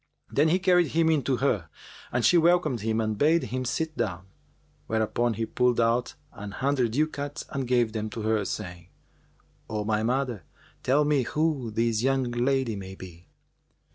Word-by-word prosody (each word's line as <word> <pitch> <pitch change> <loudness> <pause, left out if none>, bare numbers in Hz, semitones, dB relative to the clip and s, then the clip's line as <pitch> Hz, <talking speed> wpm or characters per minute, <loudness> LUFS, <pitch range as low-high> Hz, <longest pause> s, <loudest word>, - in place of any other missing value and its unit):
Then 145 +3 +3
he 175 - +3
carried 180 -2 +3
him 160 +1 +2
in 155 -3 +2
to 130 -2 +1
her 105 - 0 0.4
and 120 -2 +1
she 175 - +5
welcomed 170 -6 +3
him 110 +1 0
and 110 -2 -1
bade 160 +3 +4
him 130 0 -3
sit 155 +5 -2
down; 90 -3 -3 0.6
whereupon 110 +1 0
he 115 - -2
pulled 125 +1 +1
out 115 +1 +1 0.2
an 100 0 -8
hundred 130 -3 0
ducats 145 +1 -2
and 135 -3 -3
gave 120 -3 +2
them 110 -1 -3
to 110 0 -6
her, 110 -1 +1
saying, 90 -4 -6 0.8
"O 105 -1 -2
my 110 0 +1
mother, 125 -2 -1 0.4
tell 145 +3 +2
me 145 -2 +2
who 150 -1 -1
this 115 0 0
young 135 -1 +1
lady 125 -1 0
may 95 -1 -8
be." 90 -2 -12
120 Hz, 170 wpm, -27 LUFS, 110-145 Hz, 0.8 s, she